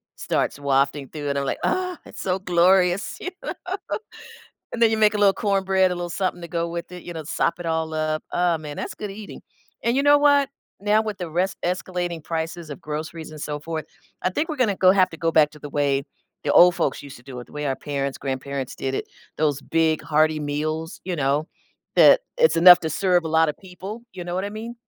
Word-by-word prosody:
starts - - -1
wafting 140 0 +1
through 145 -2 -5
and 140 0 0
I'm 140 - -2
like, - - -1
"Oh, 365 -1 0
it's - - -9
so 185 -1 0
glorious." 180 +1 +2
You 370 - -5
know? - - -3 1.2
And 235 - -4
then 230 -1 +6
you - - +2
make 215 -1 +4
a - - 0
little 200 -1 +5
cornbread, 195 -2 +2
a - - -1
little 175 0 -4
something 185 0 -2
to - - -5
go 170 0 -2
with 170 +1 -6
it, 180 -1 -8
you 175 - -7
know, 160 -2 -6
sop 165 - 0
it 175 - -6
all 160 -1 -1
up. 155 0 -1
Oh 175 -2 +2
man, 150 -2 -8
that's - - -5
good 210 - -6
eating. 205 +1 -9 0.4
And 235 +2 +1
you 275 - +2
know 290 0 +7
what? 285 -1 +4 0.3
Now 210 +2 +2
with 215 -2 -5
the 175 -2 -4
res 180 +4 -1
escalating 175 -2 -2
prices 165 0 -4
of 145 - -7
groceries 155 +1 -6
and 155 - -9
so 150 0 -3
forth, 155 0 -5 0.4
I 185 - +1
think 300 - -1
we're 310 - -3
gonna 225 -7 +1
go 185 0 +6
have 185 -1 +3
to 165 - -9
go 165 0 0
back 155 -2 +5
to 150 - -14
the 145 - -8
way 140 -1 0 0.4
the - - +1
old 180 0 +7
folks 140 - -1
used 140 -1 -10
to - - -18
do 130 -1 -9
it, 120 - -11
the - - -18
way 150 0 -3
our 135 -1 -1
parents, 140 -2 -3
grandparents 135 -1 -4
did 135 0 -3
it, - - -2 0.3
those 145 -3 +1
big 160 +1 +1
hearty 155 0 +2
meals, 155 +3 -3
you 185 - -2
know, 145 +1 +1 0.5
that - - +8 0.2
it's 480 -1 +4
enough 175 +1 +9
to 160 - -2
serve 180 +1 +2
a - - -2
lotta 160 -1 +3
people, 190 +6 -9
you 180 -2 -6
know 175 0 -4
what 190 - -1
I - - -2
mean? 225 +3 -7
170 Hz, 235 wpm, -23 LUFS, 150-190 Hz, 1.2 s, enough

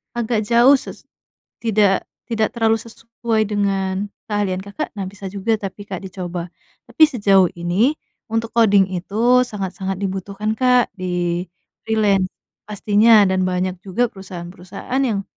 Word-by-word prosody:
agak 235 -2 0
jauh 240 +5 +6
sus - - -10 0.6
tidak 210 -3 +2 0.2
tidak 220 -2 0
terlalu 225 -2 +2
sesuai 230 -1 -3
dengan 200 -1 -1 0.2
keahlian 205 -3 -1
Kakak, 200 +10 -5
nah 195 - -3
bisa 195 0 -8
juga, 200 +3 0
tapi, 205 -1 -6
Kak, 190 -2 -6
dicoba, 180 -2 -6 0.3
tapi 315 - +4
sejauh 200 -9 +3
ini 180 - +1 0.3
untuk 225 -1 -2
koding 200 -4 +4
itu 225 +8 +2
sangat-sangat 195 -3 -4
dibutuhkan, 195 +2 -3
Kak, 250 -2 +3
di 180 -1 -2 0.4
freelance. 205 -4 +2 0.4
Pastinya, 210 +1 +4
dan 185 0 +1
banyak 185 0 -1
juga 210 +5 -1
perusahaan-perusahaan 190 +5 -7
yang 205 -5 -1
200 Hz, 130 wpm, -20 LUFS, 190-225 Hz, 0.6 s, jauh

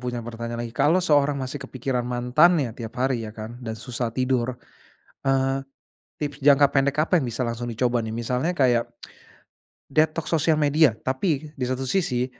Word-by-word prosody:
punya 120 -2 -4
pertanyaan 115 0 -5
lagi, 115 - -7
kalau 145 +7 +3
seorang 145 -3 +3
masih 135 +1 -4
kepikiran 130 -1 -3
mantannya, 125 +3 +3
tiap 115 -2 -8
hari, 125 -2 0
ya - - -10
kan, 115 +3 -8
dan 110 -2 -5
susah 120 +1 -3
tidur, 130 0 -1 0.7
eee, 135 0 +1 0.5
tips 145 -1 -4
jangka 140 0 +6
pendek 140 +1 +1
apa 175 +3 +2
yang 135 - -2
bisa 120 +2 -3
langsung 120 0 -3
dicoba, 120 +1 0
nih? 110 - -4
Misalnya 125 +8 -1
kayak 125 -6 +2 1.1
detox 155 +2 +1
sosial 160 -1 +3
media, 150 -4 +3
tapi 150 +2 -1
di 125 - 0
satu 130 +1 -2
sisi, 130 -4 0
130 Hz, 165 wpm, -24 LUFS, 120-145 Hz, 1.1 s, jangka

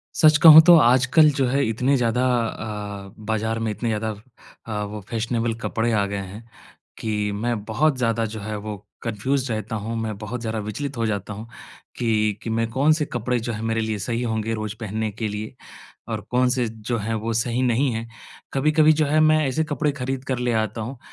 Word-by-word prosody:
सच 155 -1 +6
कहूँ 160 -1 +12
तो 175 - +9
आजकल 130 +3 +5
जो 135 -2 +1
है 135 +3 +1
इतने 125 +5 +1
ज़्यादा 125 0 +1
अ, 105 -5 -3
बाज़ार 110 +1 -1
में 115 -1 -1
इतने 115 +3 -3
ज़्यादा 110 0 -1 0.6
अ, 105 -2 -3
वो 105 +1 -6
फ़ैशनेबल 115 0 -1
कपड़े 115 +1 0
आ 105 -2 +2
गए 100 0 -4
हैं 100 +3 -7 0.6
कि 105 -2 -1
मैं 110 0 -2
बहुत 130 +6 +1
ज़्यादा 115 -2 +1
जो 110 - -6
है 105 +1 -4
वो 105 0 -5 0.3
कन्फ़्यूज़ड 125 +4 -1
रहता 110 +1 -3
हूँ 115 +1 -3
मैं 110 -2 -3
बहुत 110 +3 -5
ज़्यादा 110 -1 -3
विचलित 130 +7 -5
हो 115 -1 0
जाता 105 -1 -3
हूँ 110 +3 -9 0.5
कि 110 -3 +1
कि 115 - -4
मैं 115 0 0
कौन-से 150 +6 +2
कपड़े 120 +1 -1
जो 120 +1 -3
हैं 110 0 -5
मेरे 115 0 0
लिए 110 -1 -2
सही 115 +4 -2
होंगे 110 -1 -1
रोज़ 110 -1 -4
पहनने 110 0 -2
के 110 +1 -3
लिए 105 +1 -6 0.5
और - - -3
कौन-से 125 -1 +2
जो 110 +2 -4
हैं 110 +2 -2
वो 110 +1 -2
सही 120 +2 0
नहीं 130 +2 +2
है। 115 +1 -4 0.5
कभी-कभी 155 +3 +4
जो 155 -1 +1
है 155 +2 +2
मैं 155 0 +5
ऐसे 160 +5 0
कपड़े 150 -1 -1
ख़रीद 135 -1 -4
कर 130 -2 -2
ले 125 -1 0
आता 110 0 -1
हूँ 120 +4 -6
115 Hz, 200 wpm, -23 LUFS, 110-130 Hz, 0.6 s, कहूँ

